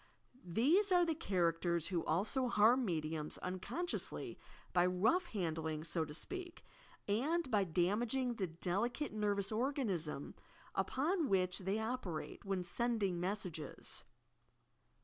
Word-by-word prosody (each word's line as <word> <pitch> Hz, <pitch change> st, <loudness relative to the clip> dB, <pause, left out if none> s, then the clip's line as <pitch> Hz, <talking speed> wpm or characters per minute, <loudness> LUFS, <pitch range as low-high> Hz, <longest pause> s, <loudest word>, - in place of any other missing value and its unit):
" 255 Hz, -, -26 dB, 0.2 s
These 370 Hz, -, +4 dB
are 355 Hz, -1 st, +6 dB
the 330 Hz, -, +1 dB
characters 170 Hz, -, +1 dB
who 175 Hz, -3 st, 0 dB
also 215 Hz, -, +2 dB
harm 235 Hz, +3 st, +5 dB
mediums 155 Hz, -5 st, -2 dB
un 185 Hz, +1 st, -2 dB
consciously 350 Hz, -, -3 dB, 0.3 s
by 175 Hz, -, +5 dB
rough 220 Hz, -, +3 dB
handling, 160 Hz, -, -2 dB
so 165 Hz, 0 st, -1 dB
to 150 Hz, -, -8 dB
speak; 360 Hz, -, -5 dB, 0.4 s
and 275 Hz, +9 st, +1 dB
by 205 Hz, -3 st, +3 dB
dam 180 Hz, +5 st, +2 dB
aging 245 Hz, +1 st, 0 dB
the 190 Hz, -, 0 dB
delicate 195 Hz, -, -1 dB
nervous 205 Hz, -2 st, +1 dB
organism 215 Hz, -, -1 dB, 0.4 s
upon 310 Hz, +2 st, +1 dB
which 185 Hz, -2 st, +2 dB
they 195 Hz, +2 st, -1 dB
operate, 220 Hz, -8 st, -3 dB
when 195 Hz, -2 st, -1 dB
sending 205 Hz, -2 st, 0 dB
messages. 180 Hz, -5 st, -3 dB
200 Hz, 130 wpm, -37 LUFS, 175-255 Hz, 0.4 s, are